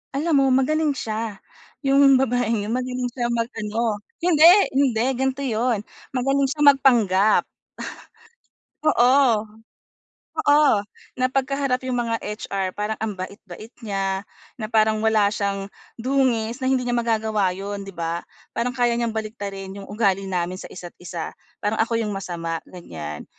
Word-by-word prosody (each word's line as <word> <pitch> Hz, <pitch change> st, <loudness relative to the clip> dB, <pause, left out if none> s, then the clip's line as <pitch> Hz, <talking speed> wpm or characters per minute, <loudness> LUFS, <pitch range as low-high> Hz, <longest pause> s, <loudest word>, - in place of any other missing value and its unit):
Alam 300 Hz, 0 st, +2 dB
mo 270 Hz, -, +4 dB
magaling 295 Hz, +2 st, +2 dB
siya. 220 Hz, -2 st, -3 dB, 0.5 s
Yung 275 Hz, 0 st, +6 dB
babaeng 245 Hz, -4 st, +1 dB
yun -, -, -3 dB
magaling 255 Hz, 0 st, -2 dB
siya 240 Hz, -1 st, -2 dB
mag 230 Hz, 0 st, 0 dB
ano. 215 Hz, 0 st, -1 dB, 0.2 s
Hinde! 330 Hz, -2 st, +4 dB, 0.3 s
Hinde, 255 Hz, -5 st, +2 dB
gan'to 265 Hz, +2 st, -1 dB
yun, 230 Hz, -1 st, +1 dB, 0.3 s
magaling 270 Hz, +2 st, +1 dB
siya 295 Hz, +2 st, -4 dB
magpanggap. 215 Hz, -7 st, +4 dB, 1.4 s
Oo. 250 Hz, -4 st, +4 dB, 1.1 s
Oo! 295 Hz, -2 st, +6 dB, 0.4 s
Na 255 Hz, -, +2 dB
'pagka 270 Hz, +1 st, 0 dB
harap 265 Hz, -3 st, 0 dB
yung 250 Hz, -1 st, -1 dB
mga 230 Hz, -1 st, -1 dB
HR 195 Hz, -2 st, -3 dB
parang 210 Hz, +1 st, -1 dB
ang 210 Hz, -3 st, -3 dB
bait-bait 200 Hz, +3 st, -9 dB
niya, 195 Hz, -1 st, -1 dB, 0.4 s
na 215 Hz, -, -3 dB
parang 215 Hz, 0 st, +3 dB
wala 215 Hz, -2 st, +3 dB
siyang 200 Hz, -1 st, -2 dB, 0.3 s
dungis 245 Hz, -2 st, +1 dB
na 260 Hz, -, 0 dB
hindi 255 Hz, -2 st, +1 dB
niya 245 Hz, -, -1 dB
magagawa 220 Hz, -4 st, +1 dB
'yon 200 Hz, 0 st, -5 dB
'di -, -, -8 dB
ba? 170 Hz, 0 st, -2 dB, 0.3 s
Parang 235 Hz, +2 st, 0 dB
kaya 240 Hz, -1 st, +2 dB
niyang 235 Hz, -2 st, -1 dB
baliktarin 200 Hz, -3 st, -5 dB
yung -, -, -11 dB
ugali 195 Hz, -2 st, +1 dB
namin 180 Hz, 0 st, -2 dB
sa -, -, -8 dB
isa't-isa, 175 Hz, -1 st, -7 dB, 0.3 s
parang 210 Hz, +2 st, -1 dB
ako 230 Hz, 0 st, 0 dB
yung 210 Hz, -2 st, -2 dB
masama, 170 Hz, -4 st, -4 dB
ganyan. 80 Hz, -, -8 dB
225 Hz, 145 wpm, -23 LUFS, 200-255 Hz, 1.4 s, Yung